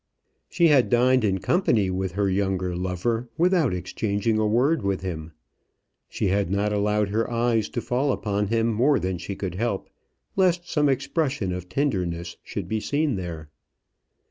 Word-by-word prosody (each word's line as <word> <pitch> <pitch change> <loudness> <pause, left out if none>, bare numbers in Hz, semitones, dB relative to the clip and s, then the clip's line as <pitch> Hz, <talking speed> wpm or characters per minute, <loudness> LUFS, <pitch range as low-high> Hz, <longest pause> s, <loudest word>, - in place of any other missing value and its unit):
She 170 -2 +3
had 135 -4 +4
dined 125 +1 +4
in 95 -3 +2
company 115 - +2
with 95 -1 -2
her 100 +1 +1
younger 95 -2 0
lover 95 +7 -2
without 175 -5 +3
exchanging 100 +4 -1
a 110 - +2
word 130 +8 +2
with 100 -1 -1
him. 80 -4 -5 0.8
She 100 - -1
had 100 -1 +1
not 100 +2 0
allowed 105 0 +1
her 110 +4 0
eyes 115 -2 +1
to 120 - -3
fall 130 +4 0
upon 105 -3 -1
him 115 +2 +1
more 130 +6 +3
than 90 -1 -2
she 100 +2 -5
could 95 -3 -4
help, 100 0 -2 0.4
lest 180 -2 +2
some 150 -4 +2
expression 135 - -1
of 90 0 -6
tenderness 90 - -2
should - - -5
be 110 - -1
seen 145 +2 0
there. 80 -5 -6
105 Hz, 165 wpm, -25 LUFS, 95-125 Hz, 0.8 s, had